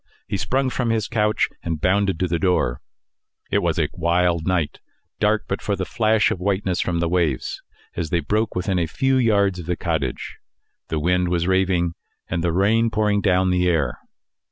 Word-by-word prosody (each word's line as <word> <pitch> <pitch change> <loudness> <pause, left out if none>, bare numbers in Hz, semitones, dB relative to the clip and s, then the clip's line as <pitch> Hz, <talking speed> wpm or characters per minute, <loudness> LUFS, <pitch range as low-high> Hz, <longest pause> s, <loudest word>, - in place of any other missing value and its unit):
He - - -2
sprung 130 +6 0
from 125 -2 -1
his 110 -2 0
couch 105 -3 +1
and 80 -2 -3
bounded 95 +1 +1
to 90 - +2
the 85 -1 -1
door. 90 -10 +1 0.7
It - - +3
was - - 0
a - - +2
wild 85 0 +1
night 90 -5 0 0.4
dark, 105 +1 +2
but 95 - -3
for 100 - -1
the 95 -1 -3
flash 110 -1 +2
of - - -2
whiteness 95 -1 0
from 85 -2 -1
the 85 - +1
waves 85 -6 -1 0.3
as 85 -2 -3
they 85 - +1
broke 105 +8 -1
within 90 0 0
a 85 - 0
few 135 - +1
yards 100 -6 +2
of 85 - -8
the 90 - 0
cottage; 80 -7 -3 0.5
the 80 - -2
wind 90 +3 +1
was 85 -1 0
raving, 95 -2 +1 0.3
and 85 - -2
the 85 - +1
rain 110 +6 +2
pouring 105 -1 +1
down 95 -1 +2
the 90 0 +2
air. 75 -7 0
90 Hz, 190 wpm, -22 LUFS, 85-105 Hz, 0.7 s, It